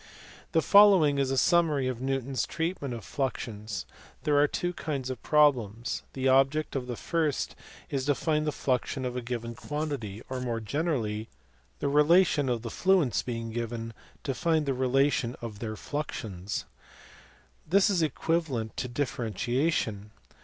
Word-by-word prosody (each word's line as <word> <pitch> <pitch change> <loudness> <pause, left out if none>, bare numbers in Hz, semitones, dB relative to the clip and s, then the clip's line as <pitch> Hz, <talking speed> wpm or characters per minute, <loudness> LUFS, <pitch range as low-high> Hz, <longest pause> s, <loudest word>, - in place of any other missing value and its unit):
The 160 - +3
following 190 -9 +6
is 135 -1 +1
a 135 - 0
summary 155 -5 +3
of 125 -2 -3
Newton 135 0 -1
s 130 -4 -1
treatment 160 -6 -3
of 115 - -8
fluxions. 110 - -3 0.4
There 150 - +2
are 145 - +5
two 175 +4 -2
kinds 140 -5 -3
of 125 - -6
problems. 125 -7 +2
The 135 0 -1
object 135 +4 +3
of 125 -2 -2
the 120 - -3
first 155 0 -1 0.4
is 135 -2 -1
to 145 0 +2
find 155 +2 0
the - - +2
fluxion 130 -1 -1
of 125 0 -3
a 125 - -2
given 115 -1 -4
quantity, 135 -6 -4
or 130 -1 -4
more 120 -2 -2
generally 110 -4 -2 0.5
"the - - -2
relation 150 0 +4
of 120 -2 -1
the 115 - -4
fluents 180 - +2
being 115 -2 -4
given, 115 0 -4 0.3
to 135 - -1
find 160 +1 +1
the 135 - +1
relation 130 -1 +1
of 110 -3 -7
their 110 -1 -4
fluxions.^ 105 -9 -4 1.1
This 195 +4 +5
is 180 -4 +2
equivalent 155 -6 -1
to 125 - -2
differentiation. 120 -3 -1
130 Hz, 155 wpm, -28 LUFS, 115-150 Hz, 1.1 s, following